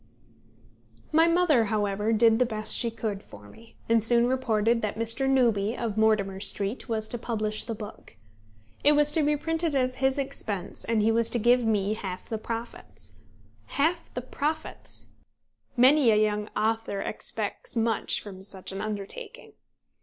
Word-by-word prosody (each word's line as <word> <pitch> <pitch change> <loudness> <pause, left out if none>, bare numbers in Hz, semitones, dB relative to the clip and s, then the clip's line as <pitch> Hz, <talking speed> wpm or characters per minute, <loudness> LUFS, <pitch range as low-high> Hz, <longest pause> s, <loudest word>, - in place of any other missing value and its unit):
My 325 +2 +5
mother 335 -9 +3
however 205 0 0
did 225 0 +4
the 250 - +4
best 215 -2 +2
she 235 - +1
could 215 -3 -4
for 105 - -14
me, 225 - -17
and 230 -1 +3
soon 235 +1 +4
reported 235 -3 +1
that 210 0 -3
Mr. 230 +4 -1
Newby 235 -4 +2
of 230 -4 -3
Mortimer 215 -3 +2
Street 200 +4 -3
was 220 -1 -1
to 240 - -4
publish 215 -2 -2
the 230 -2 -4
book. 210 - -11 0.7
It 295 - +7
was 295 0 +3
to 320 - +3
be 295 0 +2
printed 325 0 -1
at 255 -1 +1
his 265 +1 0
expense, 220 -9 -4
and 225 -2 +1
he 225 - +3
was 230 0 +1
to - - 0
give 240 +2 +3
me 210 -2 +1
half 185 -4 -6
the 220 - -3
profits. 230 +1 -7 0.6
Half 335 +4 0
the 250 - -2
profits! 295 +4 -4 0.7
Many 260 +1 +6
a 215 - +5
young 210 0 +1
author 220 -2 -1
expects - - -3
much 225 -2 +1
from 190 -3 -10
such 190 -1 -6
an 195 - -5
undertaking. 215 - -7
225 Hz, 160 wpm, -27 LUFS, 210-255 Hz, 0.7 s, It